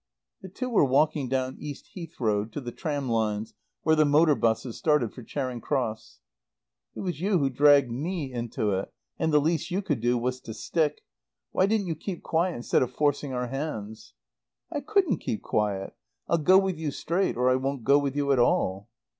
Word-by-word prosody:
The 190 - -9
two 255 +8 -4
were 235 -9 +3
walking 140 0 +2
down 130 0 -1
East 145 -2 -8
Heath 170 -3 -9
Road 105 -2 0
to - - -3
the 120 -3 -6
tram 145 -2 -3
lines 110 -2 -1 0.3
where 160 - +4
the 155 - +5
motor 150 +2 +5
buses 115 -1 0
started 150 -8 +1
for 125 - -10
Charing 125 0 -4
Cross. 115 - -3 0.7
"It - - -5
was 175 -5 -3
you 195 0 +2
who 140 -4 +1
dragged 140 -1 +5
me 145 +1 -3
into 115 -3 -2
it, 95 0 -2 0.3
and 160 -1 +1
the 150 - +5
least 160 +2 0
you 190 +3 -1
could 145 -9 -1
do 120 +1 +2
was 125 +2 -2
to 110 - -8
stick. 150 +5 -1 0.5
Why 190 - +3
didn't 215 -1 +1
you 170 - -1
keep 175 +3 -6
quiet 170 +2 0
instead 120 - +1
of 125 -1 0
forcing 145 0 0
our 125 -1 -2
hands?" 110 - -5 0.6
"I - - -2
couldn't 350 - +1
keep 110 - -4
quiet. 100 -2 -1 0.3
I'll 170 - +2
go 185 +5 +6
with 190 -4 +1
you 160 -2 -2
straight 170 +3 -1
or 125 +1 +3
I - - +4
won't 135 -1 -2
go 140 +3 +5
with 140 -1 -2
you 140 -1 +1
at 135 - +3
all." 100 -3 +1
140 Hz, 200 wpm, -27 LUFS, 120-160 Hz, 0.7 s, go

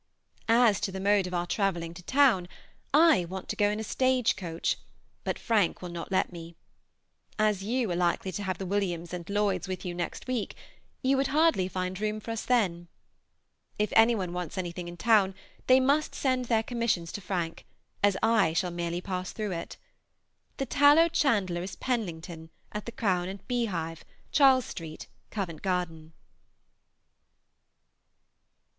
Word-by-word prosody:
As 230 -3 +5
to 195 - -2
the 190 - -5
mode 200 -1 +3
of 180 - -7
our 175 0 0
travelling 175 -4 -1
to 175 - -10
town, 250 -5 +3 0.4
I 310 - +6
want 190 +2 -7
to - - -2
go 205 0 +3
in 210 +1 -2
a - - -3
stage 255 +1 +2
coach, 170 -4 -2 0.4
but - - -2
Frank 210 -7 +1
will 180 - -5
not 170 +2 -6
let 185 - +1
me. 170 0 -9 0.8
As 210 -3 +1
you 230 -1 0
are - - 0
likely 175 +2 0
to 205 - -4
have 190 -2 -2
the 190 - -5
Williams 180 -3 -2
and 175 0 -6
Lloyds 200 -3 0
with 185 0 -5
you 180 - -3
next 175 0 -4
week, 250 -5 -2 0.5
you 265 +1 +3
would 270 0 +2
hardly 300 - +3
find 185 +1 -4
room 215 0 -1
for 230 - -6
us 225 - -3
then. 185 -9 +1 0.9
If 210 0 0
any 230 +1 +6
one 185 -4 -3
wants 180 -2 -5
anything 175 -1 -4
in 175 0 -8
town, 200 -1 +3 0.3
they 255 0 +7
must 285 +4 +1
send 255 -2 0
their 225 -2 +2
commissions 230 -9 -1
to 205 - -6
Frank, 175 -3 -3 0.3
as 200 -1 +3
I 220 -7 +4
shall 180 +1 0
merely 170 0 -3
pass 185 -1 -4
through 210 -2 -4
it. 170 -2 -5 0.8
The 270 - -1
tallow 290 +5 +5
chandler 205 - +1
is 185 +2 -6
Penlington, 170 -9 -4 0.2
at 210 +1 -6
the - - -4
Crown 185 -6 0
and 195 0 -9
Beehive, 180 -10 -2 0.3
Charles 265 -3 +5
Street, 160 -3 -7 0.2
Covent 180 -7 -4
Garden. 165 -4 -2
195 Hz, 165 wpm, -28 LUFS, 175-230 Hz, 0.9 s, they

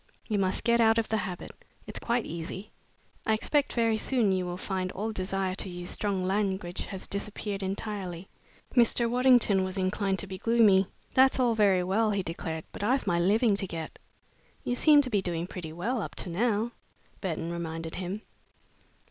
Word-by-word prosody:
"You 210 -3 0
must 190 -1 0
get 235 0 +4
out 225 0 +5
of 230 - 0
the 220 - +1
habit. 180 -4 -5 0.3
It's - - -6
quite 235 0 0
easy. 170 +5 -6 0.5
I 220 - +2
expect 285 +6 0
very 230 -2 +2
soon 230 -3 +2
you 185 -1 0
will 175 0 -4
find 185 -1 -2
all 215 +3 -3
desire 190 -1 -2
to 190 - -4
use 175 0 -5
strong 200 -3 -1
language 190 -2 -1
has 190 -1 -5
disappeared 200 0 -4
entirely." 190 -2 -4 0.5
Mr. 235 -1 +4
Waddington 245 -5 +4
was 185 +1 -4
inclined 190 +1 0
to 195 - -3
be 190 -1 -7
gloomy. 215 -5 +4 0.3
"That's 265 0 +5
all 245 -2 +3
very 200 -4 +3
well," 210 +5 +2
he 200 -2 0
declared, 165 -1 -4
"but - - -6
I've 255 +5 +2
my 170 -1 +1
living 210 +5 +3
to 195 - -2
get." 165 -2 -6 0.6
"You 245 - -1
seem 295 +3 +6
to 255 - -2
be 205 -2 +2
doing 170 -2 -2
pretty 175 -4 -7
well 215 +9 -2
up - - -6
to 175 - -3
now," 220 +4 +1 0.5
Burton 170 -3 -3
reminded 165 -1 -4
him. 190 +4 -4
195 Hz, 180 wpm, -29 LUFS, 185-225 Hz, 0.6 s, seem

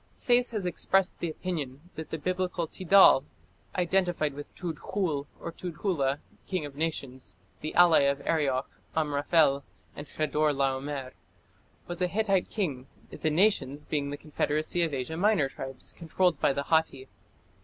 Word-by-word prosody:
Sayce 245 0 +2
has 215 -5 -3
expressed 185 +2 +1
the 170 - -2
opinion 155 -2 -5
that 160 - -7
the 160 - -3
Biblical 180 +1 -1
Tidal, 185 -4 +6 0.5
identified 175 -4 +1
with 145 +1 -9
Tudkhul 165 -3 -3
or - - -5
Tudhula, 165 -5 -1 0.3
"king 185 -5 -2
of 145 -2 -9
nations", 140 -5 -4 0.3
the 155 - -5
ally 175 -2 +7
of 140 0 +2
Arioch, 140 -5 +1 0.3
Amraphel, 145 -1 +2 0.3
and 145 - -8
Chedor 155 0 +1
laomer, 135 0 -2 0.7
was 175 +1 -6
a 180 - +3
Hittite 195 -1 +1
king, 140 - -3 0.2
the 160 - -1
"nations" 150 -5 +2
being 145 -2 -2
the 145 - -4
confederacy 155 +2 -1
of 165 -2 +1
Asia 140 +3 -3
Minor 195 -6 +3
tribes 135 -1 -5
controlled 170 -1 0
by - - +3
the 140 +1 -2
Hatti. 160 -4 +1
155 Hz, 145 wpm, -28 LUFS, 140-180 Hz, 0.7 s, ally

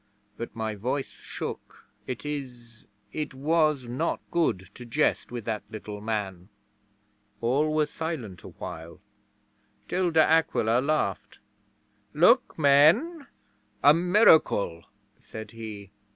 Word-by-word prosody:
But 115 - -7
my 110 -1 -3
voice 125 +7 -3
shook. - - -7 0.2
It 130 +2 -5
is 125 -6 -7 0.3
it 150 -3 -4
was 150 -2 +1
not 130 +8 -1
good 95 - 0
to 125 - -10
jest 120 +3 0
with 120 -3 -6
that 110 -2 -2
little 105 -1 -8
man. 100 -4 -4 0.9
'All 135 +7 +1
were 155 0 +2
silent 145 - -5
awhile, 85 0 -9 0.9
till 180 0 0
De 160 -1 +5
Aquila 125 -7 +2
laughed. 110 -9 -1 0.8
"Look, 235 - +4
men 165 - +4 0.6
a 145 +2 +8
miracle," 165 - +3 0.3
said 110 -1 -9
he. 110 -4 -9
130 Hz, 110 wpm, -27 LUFS, 110-155 Hz, 0.9 s, a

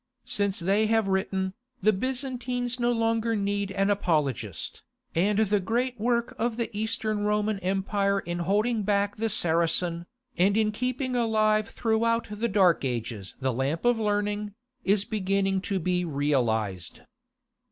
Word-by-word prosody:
Since 200 -1 0
they 195 +5 +2
have 225 -2 +2
written, 190 -1 0 0.3
the 215 0 +3
Byzantines 250 +1 -2
no 240 0 +2
longer 225 0 +1
need 200 -1 -1
an 195 +1 +1
apologist, 135 - -1 0.3
and 200 +5 +2
the 210 -1 +3
great 240 +5 -1
work 235 +1 0
of 235 0 0
the 230 -3 -3
East 220 +2 -2
Roman 210 -1 0
Empire 195 +1 0
in 175 -2 -4
holding 210 +6 +1
back 205 0 0
the 225 +1 0
Saracen, 170 -2 +1 0.3
and 200 +3 +4
in 215 -1 +2
keeping 255 +3 -2
alive 215 -2 +2
throughout 230 0 +1
the 215 +3 -1
Dark 190 -6 +4
Ages 115 -6 -3
the 130 -1 0
lamp 135 - -1
of 240 -1 +3
learning, 205 -1 -1 0.3
is 200 +1 +2
beginning 195 -2 0
to 195 0 -2
be 180 0 0
realized. 115 - -1
205 Hz, 140 wpm, -27 LUFS, 180-225 Hz, 0.3 s, and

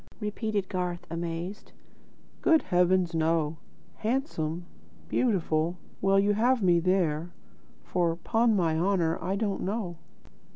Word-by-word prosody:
repeated 210 -2 -2
Garth, 180 -2 -3
amazed: 170 +4 -5 0.7
"Good 320 -1 +4
heavens, 180 -1 +2
no! 160 -1 +1 0.4
Handsome? 180 - -2 0.4
Beautiful? 175 -7 +1 0.2
Well 195 +1 +4
you 205 +1 +3
have 235 +2 +2
me 175 -2 +5
there, 175 -2 +1 0.5
for, 170 -2 0
'pon 225 +6 +2
my 165 -4 +1
honour, 170 -3 +1
I 185 +3 0
don't 200 -1 -1
know." 190 -3 -3
180 Hz, 115 wpm, -28 LUFS, 165-205 Hz, 0.7 s, me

